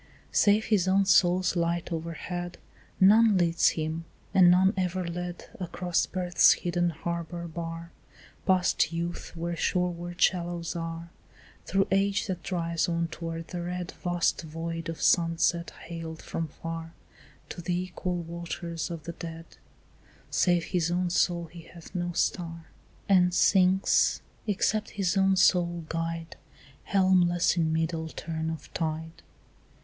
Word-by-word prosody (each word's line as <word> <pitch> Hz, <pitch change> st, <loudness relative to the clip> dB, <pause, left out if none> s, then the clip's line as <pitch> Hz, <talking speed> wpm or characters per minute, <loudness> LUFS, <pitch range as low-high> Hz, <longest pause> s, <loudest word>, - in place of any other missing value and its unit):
Save 210 Hz, +1 st, +4 dB
his 200 Hz, -5 st, +2 dB
own 195 Hz, +1 st, +3 dB
soul's 185 Hz, -1 st, +4 dB
light 170 Hz, 0 st, -1 dB
overhead, 170 Hz, +2 st, -4 dB, 0.4 s
None 210 Hz, +2 st, +6 dB
leads 170 Hz, -2 st, +3 dB
him, 160 Hz, +1 st, -3 dB, 0.3 s
and 180 Hz, -2 st, +7 dB
none 190 Hz, +3 st, +5 dB
ever 185 Hz, -1 st, -1 dB
led, 175 Hz, +1 st, -5 dB
Across 175 Hz, -1 st, -1 dB
birth's 180 Hz, -1 st, +4 dB
hidden 175 Hz, 0 st, 0 dB
harbour 170 Hz, +1 st, -4 dB
bar, 165 Hz, 0 st, -6 dB, 0.6 s
Past 185 Hz, -3 st, +3 dB
youth 170 Hz, +1 st, -4 dB
where 170 Hz, +1 st, -3 dB
shoreward 175 Hz, 0 st, -1 dB
shallows 175 Hz, -2 st, +1 dB
are, 165 Hz, 0 st, -5 dB, 0.6 s
Through 195 Hz, 0 st, +2 dB
age 200 Hz, +1 st, +2 dB
that 185 Hz, -5 st, -4 dB
drives 170 Hz, -2 st, -1 dB
on 170 Hz, 0 st, -1 dB
toward 165 Hz, 0 st, -6 dB
the 175 Hz, -, -4 dB
red 180 Hz, +1 st, -4 dB
Vast 175 Hz, -1 st, 0 dB
void 165 Hz, +1 st, -5 dB
of 165 Hz, -, -5 dB
sunset 170 Hz, 0 st, +2 dB, 0.2 s
hailed 165 Hz, -1 st, -7 dB
from 165 Hz, -, -3 dB
far, 165 Hz, +2 st, -7 dB, 0.6 s
To -, -, -6 dB
the 175 Hz, +1 st, -1 dB
equal 180 Hz, 0 st, -3 dB
waters 170 Hz, -1 st, -5 dB
of 165 Hz, -3 st, -6 dB
the 170 Hz, -, -5 dB
dead; 165 Hz, -1 st, -8 dB, 0.9 s
Save 175 Hz, -2 st, +3 dB
his 170 Hz, -1 st, 0 dB
own 175 Hz, 0 st, 0 dB
soul 175 Hz, -1 st, +1 dB
he 170 Hz, +1 st, -11 dB
hath 170 Hz, -2 st, -13 dB
no 175 Hz, -1 st, -2 dB
star, 165 Hz, -1 st, -1 dB, 0.4 s
And 180 Hz, -2 st, +4 dB
sinks, 190 Hz, 0 st, +3 dB, 0.2 s
except 210 Hz, +1 st, 0 dB
his 185 Hz, -4 st, +1 dB
own 195 Hz, 0 st, +4 dB
soul 175 Hz, -3 st, +3 dB
guide, 165 Hz, 0 st, -4 dB, 0.5 s
Helmless 185 Hz, -3 st, +3 dB
in 165 Hz, -2 st, +1 dB
middle 160 Hz, 0 st, -1 dB
turn 160 Hz, 0 st, -4 dB
of 160 Hz, -1 st, -7 dB
tide. 160 Hz, 0 st, -3 dB
175 Hz, 135 wpm, -28 LUFS, 165-180 Hz, 0.9 s, and